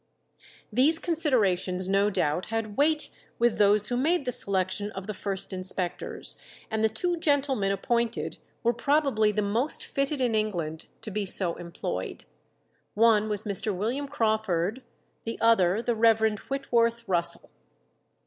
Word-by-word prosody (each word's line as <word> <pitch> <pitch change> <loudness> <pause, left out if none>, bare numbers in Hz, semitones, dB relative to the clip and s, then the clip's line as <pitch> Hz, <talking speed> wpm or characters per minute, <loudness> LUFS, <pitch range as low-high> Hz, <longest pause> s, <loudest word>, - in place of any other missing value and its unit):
These 280 +8 +4
considerations 205 - +1
no 195 +2 +3
doubt 175 -3 -1
had 225 -2 -3
weight 305 +3 +2 0.3
with 235 -1 +1
those 205 0 +6
who 245 - 0
made 305 +3 +1
the 250 - -1
selection 200 -1 -1
of 190 0 -6
the 215 - -4
first 195 0 -4
inspectors, 185 -1 -3 0.3
and 220 0 0
the 220 - +4
two 345 +11 -1
gentlemen 275 -10 +1
appointed 235 +4 -1 0.2
were 235 0 +3
probably 265 -4 +2
the 210 0 -1
most 230 +9 -1
fitted 275 +1 -1
in 245 -3 +1
England 175 -8 -2
to 215 - -6
be 205 0 -2
so 180 -2 +2
employed. 170 - -5 0.7
One 215 -1 +4
was 210 0 -1
Mr. 200 -1 +1
William 250 +9 -2
Crawford, 220 -4 0 0.4
the 230 - -5
other 220 -2 +3
the 240 - +1
Rev. 220 -1 +3
Whitworth 235 -4 0
Russell. 175 -2 -1
220 Hz, 140 wpm, -27 LUFS, 195-245 Hz, 0.7 s, those